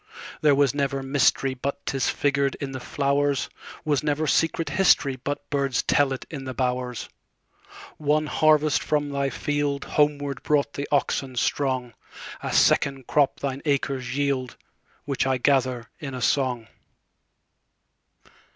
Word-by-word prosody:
There 150 -3 +5
was 140 -1 +3
never 140 -1 -1
mysteryBut 135 0 +1
'tis 135 -2 0
figured 140 -1 +1
in 140 -1 -5
the 130 - -5
flowers; 140 +1 0 0.4
SWas 145 -3 +1
never 150 +1 0
secret 165 0 +1
historyBut 145 -5 +2
birds 140 -4 0
tell 145 -2 +3
it 135 - -4
in 140 -4 -6
the 130 -1 -5
bowers. 125 -1 -2 0.9
One 155 +1 +1
harvest 155 0 +3
from 145 -1 0
thy 140 -1 -1
fieldHomeward 145 -1 -1
brought 145 -1 +1
the 140 - -4
oxen 135 -2 0
strong;A 130 -2 -3
second 135 -2 +3
crop 145 -3 +1
thine 135 -1 -3
acres 135 -3 -1
yield, 140 -3 -1 0.5
Which 135 -1 -1
I 130 -1 +2
gather 125 -2 +1
in 140 -5 -6
a 125 - -5
song. 125 -4 +1
140 Hz, 125 wpm, -25 LUFS, 130-145 Hz, 0.9 s, There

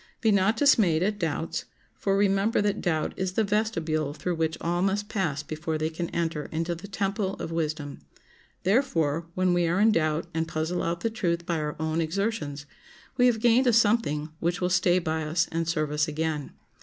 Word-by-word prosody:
Be 220 - +3
not 200 +2 +3
dismayed 195 - +4
at 205 +1 -1
doubts, 165 -1 -2 0.3
for 195 -1 0
remember 200 +2 +2
that 205 -1 0
doubt 160 -4 0
is 190 -1 -2
the 220 - +2
vestibule 165 -9 -1
through 180 +2 -2
which 160 -1 -1
all 175 +1 -1
must 200 +2 0
pass 155 -9 -1
before 155 +1 -3
they 155 +1 -1
can 170 +1 -4
enter 165 -3 -2
into 165 +2 -2
the 170 +4 -8
temple 195 0 -2
of - - -6
wisdom; 155 -3 -3 0.6
therefore, 170 - +1
when 185 -1 +2
we 175 -1 +2
are 175 +3 +1
in 220 +2 +5
doubt 155 -3 +1
and 160 0 -1
puzzle 160 +3 -2
out 170 0 -2
the 230 - 0
truth 175 -6 -1
by 170 -2 -1
our 150 -1 -3
own 160 +1 0
exertions, 160 -4 -2 0.5
we 250 -1 +5
have 235 -2 +2
gained 240 +3 +4
a 240 - +4
something 205 -9 +2
which 170 +2 -1
will 180 0 0
stay 180 -1 +3
by 160 -2 -1
us 160 +3 0
and 165 0 -1
serve 155 -3 0
us 150 0 +1
again. 155 -1 -2
170 Hz, 195 wpm, -27 LUFS, 160-200 Hz, 0.6 s, in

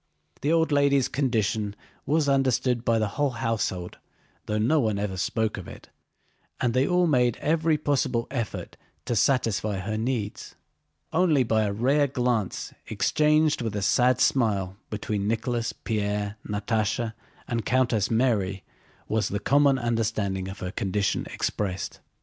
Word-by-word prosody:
The 145 - +1
old 165 -1 +3
lady's 140 -2 +3
condition 110 -6 0 0.3
was 150 +1 +2
understood 130 -3 +2
by 115 -1 +2
the 110 -1 +1
whole 145 +7 0
household 110 -7 -2 0.5
though 105 - 0
no 125 +9 +3
one 110 -6 +1
ever 100 -2 -2
spoke 105 +6 -1
of 95 - -7
it, - - -12 0.7
and 120 -2 +1
they 130 +2 +2
all 180 0 +3
made 125 -7 +2
every 160 0 +1
possible 130 -5 0
effort 120 -6 -4 0.3
to 120 - -1
satisfy 110 -3 +1
her 110 +3 -3
needs. 115 -3 -3 0.6
Only 160 -5 +4
by 110 -2 +1
a 100 - -1
rare 135 +8 +2
glance 125 -6 -1
exchanged 150 -1 +2
with 110 -3 -3
a 100 - -2
sad 125 +5 +3
smile 100 -7 +1
between 105 -1 -2
Nicholas, 115 +1 -1
Pierre, 105 -1 -2
Natásha, 110 +2 -1 0.3
and 115 -2 -2
Countess 120 -5 +1
Mary 105 -6 +1 0.4
was 110 -1 0
the 100 - -2
common 140 +5 +4
understanding 110 -5 -1
of 95 +2 -8
her 90 - -3
condition 100 +1 -1
expressed. 95 -3 -3
115 Hz, 145 wpm, -26 LUFS, 105-135 Hz, 0.7 s, Only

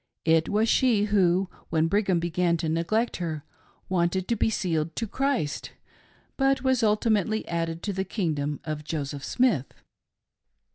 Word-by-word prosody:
It 160 0 +3
was 215 +2 +2
she 230 -4 +3
who, 190 -3 +2 0.2
when 160 0 +2
Brigham 195 -1 +2
began 170 0 +1
to 160 - -3
neglect 170 +9 0
her, 160 -4 -4 0.4
wanted 180 +1 0
to 235 - +2
be 225 - +1
sealed 165 -6 -1
to 230 - -1
Christ, 255 - -2 0.6
but 270 0 +2
was 260 -2 +2
ultimately 215 -1 +1
added 165 0 -2
to 205 - -2
the 190 0 -1
kingdom 155 -7 -2
of 155 -2 -4
Joseph 145 -2 -4
Smith. 230 - +1
180 Hz, 145 wpm, -26 LUFS, 160-215 Hz, 0.6 s, It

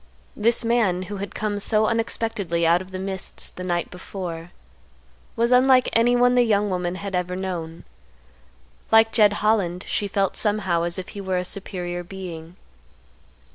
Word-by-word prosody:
This 230 +2 +2
man, 215 -6 +1
who 205 +2 -6
had 200 +1 -6
come 210 -1 -2
so 215 +1 +2
unexpectedly 225 -6 -1
out 170 +2 +4
of 185 - -10
the 185 - -6
mists 190 0 -4
the 180 - -8
night 175 -1 -2
before, 175 -2 -7 0.9
was 235 +1 +1
unlike 255 0 +5
anyone 245 +2 +4
the 250 - +5
young 210 -3 +2
woman 180 -1 -2
had 195 +1 -6
ever 180 0 -1
known. 175 -3 -5 1.1
Like 225 0 +6
Jed 210 -3 +5
Holland, 185 -5 +1
she 205 - -1
felt 195 0 0
somehow 190 -6 +1
as 170 0 -1
if 185 - -6
he 200 - -7
were 190 -1 -1
a 180 - -2
superior 180 -2 -3
being. 175 -2 -8
190 Hz, 160 wpm, -23 LUFS, 180-220 Hz, 1.1 s, Like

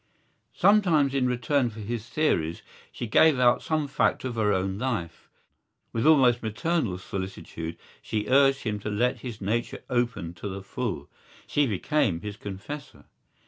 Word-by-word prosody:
Sometimes 175 -8 +4
in 130 -2 +2
return 125 +1 +1
for 110 0 -11
his 115 +1 -5
theories 85 - 0 0.3
she - - -5
gave 140 +6 +5
out 125 -1 +4
some 155 -2 -1
fact 140 - +1
of 130 -2 -3
her 110 -3 +1
own 95 0 -1
life. 110 -10 -3 0.6
With 115 +6 +1
almost 130 -6 +5
maternal 110 - -1
solicitude 90 -3 -6 0.2
she 105 -1 -2
urged 135 +1 +4
him 105 -2 -2
to 105 - -4
let 120 +5 0
his 115 -2 -7
nature 110 +4 -2
open 120 -9 -1
to 100 - -3
the 95 0 -6
full: 100 - -4 0.4
she 145 -1 +1
became 105 - 0
his 105 0 -6
confessor. 105 +9 -8
120 Hz, 150 wpm, -27 LUFS, 100-135 Hz, 0.6 s, gave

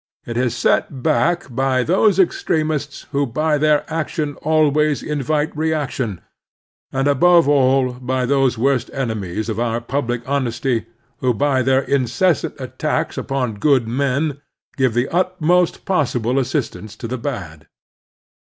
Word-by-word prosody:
It 120 - -5
is 125 -1 0
set 130 -3 0
back 165 +2 +2
by 130 0 +1
those 190 - +3
extremists 155 -5 0
who 140 -1 0
by 150 +5 0
their 150 -1 +3
action 155 -2 -2
always 150 -2 +2
invite 150 +1 -1
reaction, 145 - -2 0.7
and, 135 +1 0
above 170 +3 +5
all, 135 -2 +3
by 130 +1 -2
those 135 -2 +2
worst 130 +2 +1
enemies 110 -6 -3
of 110 -1 -3
our 115 -1 0
public 120 -1 -3
honesty 125 -4 -1 0.3
who 125 -2 +1
by 135 +2 +2
their 130 +1 +3
incessant 140 +6 0
attacks - - -2
upon 125 -6 -2
good 135 -5 +3
men 140 +4 -1 0.3
give 130 -4 +1
the 120 +2 +1
utmost 180 -1 +1
possible 130 - +1
assistance 120 -5 -3
to 115 - -6
the 130 +2 -4
bad. 85 - -6
135 Hz, 130 wpm, -20 LUFS, 120-150 Hz, 0.7 s, above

